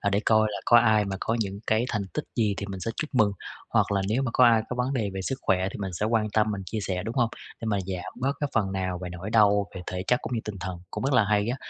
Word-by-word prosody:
à, 100 - +1
để 100 +1 +2
coi 110 -1 +4
là - - -3
có 120 - +7
ai 110 -2 +4
mà 95 -1 -3
có 115 - 0
những 100 -1 -3
cái 110 +2 +2
thành 105 -3 -1
tích 150 - -2
gì 105 -4 +2
thì 100 - -4
mình 95 -2 -6
sẽ 115 - -2
chúc 155 - -3
mừng, 105 -4 +4 0.4
hoặc - - +2
là 100 -1 +1
nếu 120 +5 +1
mà 125 - -1
có 125 - +6
ai 115 -2 +5
có 125 - -4
vấn 125 +2 0
đề 110 -7 -1
về 95 - -3
sức 135 +6 -2
khỏe 95 -1 +2
thì - - -7
mình 95 -2 -4
sẽ 105 +5 -1
quan 110 -2 +1
tâm, 110 0 +2
mình 100 -2 -3
chia 110 +4 -3
sẻ, 90 -2 -2
đúng 115 +3 -4
hông? 120 -3 +2 0.3
Để 115 - -4
mà 105 -2 +1
giảm 90 -2 -5
bớt 135 +2 +1
cái 145 - 0
phần 95 -3 +1
nào 95 -2 -2
về 90 - -4
nỗi 90 +4 -6
đau 105 -2 +4
về 90 - -5
thể 90 0 -3
chất 125 - +3
cũng 125 - -3
như 115 - 0
tinh 105 -2 -5
thần, 95 -3 -4
cũng - - -4
rất 135 - +1
là 110 -4 +5
hay 105 +1 +1
á, 125 - -1
105 Hz, 320 wpm, -26 LUFS, 95-115 Hz, 0.4 s, có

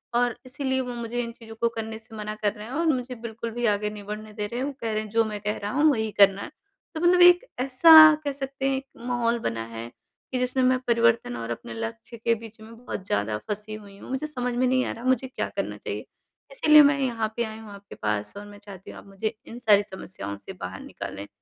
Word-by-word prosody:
और 245 -1 +2
इसीलिए 265 0 -2
वो 250 -1 -5
मुझे 235 +1 -3
इन 235 - -5
चीज़ों 225 -1 -12
को 235 - +3
करने 225 0 -5
से 220 0 -14
मना 215 0 -5
कर 205 0 +2
रहे 210 -1 -9
हैं 255 - -8
और 330 +3 0
मुझे 250 -3 0
बिल्कुल 230 0 -5
भी 240 +1 -2
आगे 210 +1 -2
नहीं 205 -1 -9
बढ़ने 210 +1 -7
दे 210 -1 -3
रहे 240 +4 -5
हैं, 265 - -1
वो - - -3
कह 225 -1 -2
रहे 215 - 0
हैं 215 - -9
जो 225 +1 +3
मैं 210 -1 -4
कह 210 - 0
रहा 205 - -2
हूँ 300 +3 +4
वही 220 -4 -1
करना 200 0 +6
है। - - -6 0.5
तो 315 - -3
मतलब 355 +1 +5
एक 355 +6 +7
ऐसा 270 +5 +5 0.3
कह 285 - -1
सकते 270 0 -3
हैं 265 - +1
एक 270 - -6 0.2
माहौल 240 -1 +1
बना 115 - -3
है 115 +1 -5 0.4
कि 255 - -1
जिसमें 250 +1 +1
मैं 255 0 +4
परिवर्तन 230 - +2
और 115 0 -5
अपने 115 - -6
लक्ष्य 230 +1 -6
के 230 +1 +1
बीच 225 0 -12
में 225 +1 -12
बहुत 190 - -5
ज़्यादा 105 +1 0
फँसी 210 +1 -4
हुई 200 -2 -12
हूँ, - - -12
मुझे 265 +4 -2
समझ 250 -4 -3
में 255 +1 +2
नहीं 255 0 +2
आ - - -2
रहा 230 - -8
मुझे 260 0 +1
क्या 255 - -3
करना - - -2
चाहिए? - - -5 0.5
इसीलिए 305 -12 +7
मैं 285 0 +4
यहाँ 225 -4 -1
पे 235 - 0
आई 220 0 -7
हूँ 220 -2 -11
आपके 200 0 -12
पास 105 -1 -2
और 205 - -8
मैं 205 0 -12
चाहती 195 -3 -11
हूँ - - -10
आप - - -16
मुझे 215 +3 -3
इन 240 - -8
सारी 205 -4 +5
समस्याओं 100 - -7
से 190 - -10
बाहर 95 +1 -6
निकालें। 100 +1 -7
230 Hz, 255 wpm, -25 LUFS, 210-255 Hz, 0.5 s, एक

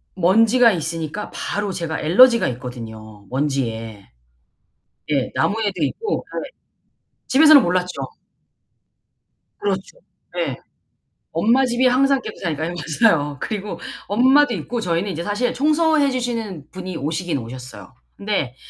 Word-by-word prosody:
먼지가 225 +6 +4
있으니까 165 +3 -4
바로 205 -1 -3
제가 165 -3 -4
알러지가 235 +11 +5
있거든요, 110 -4 -8
먼지에. 115 -7 -3 1.0
예. 135 -4 0
나무에도 210 -2 0
있고 435 - -2 0.2
예. - - -10 0.8
집에서는 300 +2 +7
몰랐죠. 180 -4 -1 1.6
그렇죠. 195 - -3 0.4
예. - - -1 0.7
엄마 255 +4 +3
집이 245 +1 +1
항상 270 +1 +3
깨끗하니까. 160 -7 -4
네 175 - -5 0.3
맞아요. 145 - +3
그리고 210 -1 -4 0.3
엄마도 260 +5 +4
있고 225 +6 -4
저희는 175 +2 -1
이제 170 0 -4
사실 220 +5 -1
청소해 305 0 +2
주시는 230 - -4
분이 185 -2 -6
오시긴 160 +2 -2
오셨어요. 115 -5 -9 0.2
근데 195 -12 -2
185 Hz, 280 characters per minute, -21 LUFS, 145-240 Hz, 1.6 s, 집에서는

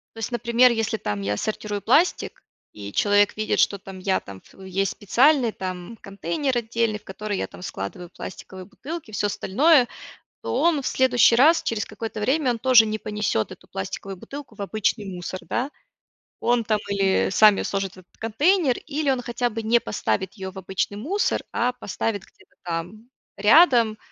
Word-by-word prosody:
То - - -9
есть, 225 - -3
например, 240 +1 +4
если 225 -1 -1
там 105 - -3
я 100 +1 -2
сортирую 210 -1 -3
пластик, 305 - +1 0.3
и 100 -1 -8
человек 205 0 +3
видит, 215 - 0
что 200 - +2
там 190 0 -10
я 190 0 +1
там 95 -1 -12
в - - -17
есть 190 0 -1
специальный, 250 +4 +3
там, 185 +3 -6
контейнер 200 - -2
отдельный, 230 -2 -1
в - - -30
который 205 +1 -5
я - - -2
там - - -13
складываю 175 - -6
пластиковые 190 +1 -9
бутылки, 290 - -8
всё 205 0 0
остальное. 255 - +3 0.6
То - - -3
он 325 -4 +2
в - - -5
следующий 245 -2 +4
раз, 310 +7 +5
через 220 -2 -1
какое-то 220 0 -6
время, 265 +5 +1
он 235 - -1
тоже 245 -1 +6
не 215 0 -2
понесет 210 - -2
эту - - -14
пластиковую 190 - -6
бутылку 280 +7 -9
в - - -14
обычный 215 +1 -1
мусор, 185 0 -6
да. 260 +4 -1 0.7
Он 240 -1 +2
там 215 -1 0
или 195 -1 +2
сами 210 +1 +5
сложит 195 -1 -2
в - - -18
этот 180 - -22
контейнер, 280 - +2
или 300 -1 -3
он 260 -2 -1
хотя 240 0 -2
бы 225 0 -5
не 225 +2 +3
поставит 190 -3 -2
ее 190 -3 -6
в 190 - -14
обычный 190 +2 -3
мусор, 350 - -1
а 245 +1 0
поставит 210 -3 -3
где-то - - -23
там 180 +7 -5 0.3
рядом, 230 - +5
215 Hz, 180 wpm, -24 LUFS, 195-245 Hz, 0.7 s, тоже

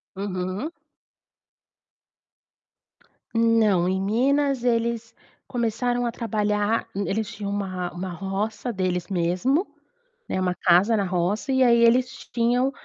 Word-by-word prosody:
Uhum. 190 - -3 2.6
Não, 220 -6 +3
em 190 0 0
Minas 265 +5 +1
eles 230 -1 0 0.3
começaram 245 +1 -1
a 235 - -1
trabalhar. 215 -1 0
Eles 200 +1 -1
tinham 200 -1 -5
uma 185 -3 -3
uma 180 +1 -5
roça 200 +7 -3
deles 185 -3 -2
mesmo, 190 - +1 0.6
né, - - -2
uma 180 -1 +1
casa 185 +7 +4
na 200 - +1
roça, 185 +8 -1
e 260 0 +4
aí 235 -1 +5
eles 245 +2 +5 0.3
tinham, 245 +3 +2
215 Hz, 110 wpm, -24 LUFS, 190-240 Hz, 2.6 s, aí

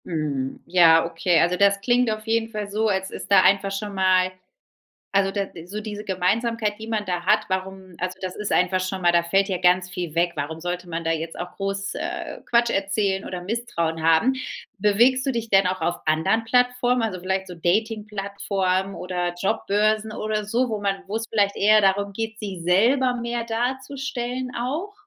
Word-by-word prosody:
Mhm. 145 -5 -3
Ja, 165 -2 +5
okay. 170 +1 +1
Also, 180 +1 +2
das 200 0 +4
klingt 245 +2 +2
auf 215 0 -3
jeden 225 0 0
Fall 210 -2 -5
so, 215 +2 0
als 190 -2 -1
ist - - -8
da 195 -1 +8
einfach 195 +1 +3
schon 200 +1 -4
mal 185 -1 +3 0.8
also 195 0 +3
da 200 0 -2
d 165 -3 -11
so 200 +5 -6
diese 210 -1 -6
Gemeinsamkeit, 210 +3 0
die 220 - -8
man 215 -2 -2
da 180 -1 -2
hat, - - +3
warum 190 0 -4
also 185 +1 -3
das 185 -1 -5
ist 210 -1 -3
einfach 185 +1 +2
schon 185 +1 -3
mal 175 -1 +3
da 170 0 +4
fällt 195 +4 +1
ja 190 - 0
ganz 180 +1 +3
viel 175 -3 -5
weg. 170 +1 +2
Warum 155 +3 -4
sollte 175 +1 -4
man 165 0 -3
da 165 - 0
jetzt 165 0 -3
auch 175 0 -6
groß, 195 0 -3
äh, - - -5
Quatsch 235 0 +4
erzählen 195 -1 0
oder 180 -1 -5
Misstrauen 175 -6 -2
haben? 165 +11 +4 0.4
Bewegst 235 +6 +3
du 270 - 0
dich 230 -2 -3
denn 195 -2 +4
auch 185 +1 -1
auf 170 - 0
anderen 160 +9 +1
Plattformen, 245 +1 +2
also 220 -5 -2
vielleicht 190 +1 -2
so 180 - -8
Dating-Plattformen 195 0 -1
oder 180 -1 -3
Jobbörsen 215 +1 +1
oder 215 0 -2
so, 240 +5 0
wo 215 -2 -3
man 200 -1 +1
wo's 220 +3 -3
vielleicht 200 -2 +1
eher 215 +1 +5
darum 200 0 +1
geht, 225 +2 -4
sich 195 -5 -6
selber 245 +9 +3
mehr 235 -1 -3
darzustellen 255 +1 -3
auch? 295 +12 -3
195 Hz, 190 wpm, -23 LUFS, 180-225 Hz, 0.8 s, da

